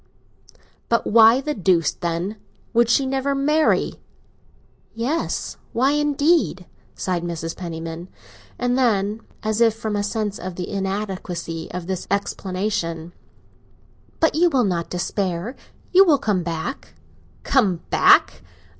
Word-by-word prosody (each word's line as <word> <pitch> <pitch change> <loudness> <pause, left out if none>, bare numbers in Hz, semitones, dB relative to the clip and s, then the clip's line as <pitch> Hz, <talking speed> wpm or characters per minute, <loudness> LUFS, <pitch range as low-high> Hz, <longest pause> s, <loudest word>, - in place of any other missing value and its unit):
"But 235 - +2
why 225 +3 +6
the 300 +2 -2
deuce, 180 - +2
then, 175 +5 -3 0.4
would 235 0 +3
she 265 +3 +3
never 270 +1 -1
marry?" 300 +3 +1 0.9
"Yes—why 260 0 -1
indeed?" 295 - +1 0.3
sighed 180 -2 -2
Mrs. 165 -1 -4
Penniman. 165 0 -6 0.5
And 245 0 0
then, 215 -3 +1 0.2
as 215 +1 -1
if 225 -2 +4
from 220 -1 -3
a 205 - 0
sense 210 0 -2
of 185 -1 -6
the 180 0 -5
inadequacy 190 -4 -4
of 180 -1 -5
this 185 0 -4
explanation, 185 -4 -2 1.1
"But 320 - +3
you 345 +3 +4
will 260 -7 +2
not 175 -3 -1
despair—you 195 - 0
will 320 -7 +4
come 210 -7 0
back?" 165 - -5 0.5
"Come 195 -11 +2
back? - - +5
205 Hz, 120 wpm, -22 LUFS, 175-250 Hz, 1.1 s, why